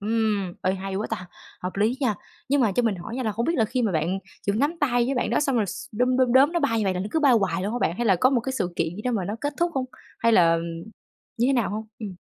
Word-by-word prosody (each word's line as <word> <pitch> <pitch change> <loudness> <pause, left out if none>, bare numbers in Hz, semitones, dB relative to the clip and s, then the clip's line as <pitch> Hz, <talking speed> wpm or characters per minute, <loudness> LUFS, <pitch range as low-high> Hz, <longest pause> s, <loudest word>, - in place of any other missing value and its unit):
Ừm, 210 -4 0
ê, 185 - +2
hay 195 0 -5
quá 210 - -2
ta, 180 -5 -4 0.3
hợp 180 +1 -4
lý 220 +6 +2
nha! 245 -7 +1 0.3
Nhưng 280 0 +3
mà 215 - +2
cho 245 - +1
mình 220 -5 +1
hỏi 225 +8 -7
nha 260 - -2
là 220 -3 -1
không 235 +3 -2
biết 335 - +1
là 225 - +3
khi 250 +3 -1
mà 215 -5 +1
bạn 165 +4 0 0.3
chỉ 200 - +2
có 210 - -1
nắm 290 +6 +1
tay 245 -4 +2
với 275 - 0
bạn 250 - 0
đó - - +2
xong 275 -4 +1
rồi 210 -3 +2
s 230 +8 -7
đom 250 +3 +1
đom 255 -2 +3
đóm 275 +5 +6
nó 345 - +1
bay 230 -6 +1
như 215 - 0
vậy 190 - +1
là 180 - -2
nó 195 - -3
cứ 320 - 0
bay 280 -3 +5
hoài 190 -5 +1
luôn 205 - -2
hả 245 - -1
bạn? 170 - 0
Hay 240 - -1
là 190 -3 +4
có 255 +9 +4
một 250 - +2
cái 265 +3 -4
sự 180 -9 -2
kiện 165 +1 -1
gì 210 - -7
đó 250 - 0
mà 195 -5 -1
nó 205 +4 -3
kết 290 0 -2
thúc 345 0 +2
hông? 260 -1 0 0.3
Hay 230 0 +3
là 165 -5 +5 0.8
như 240 - +3
thế 275 - +3
nào 240 -6 +1
hông? 215 +1 -4
Ừm. 205 -4 -6
225 Hz, 325 wpm, -25 LUFS, 195-255 Hz, 0.8 s, đóm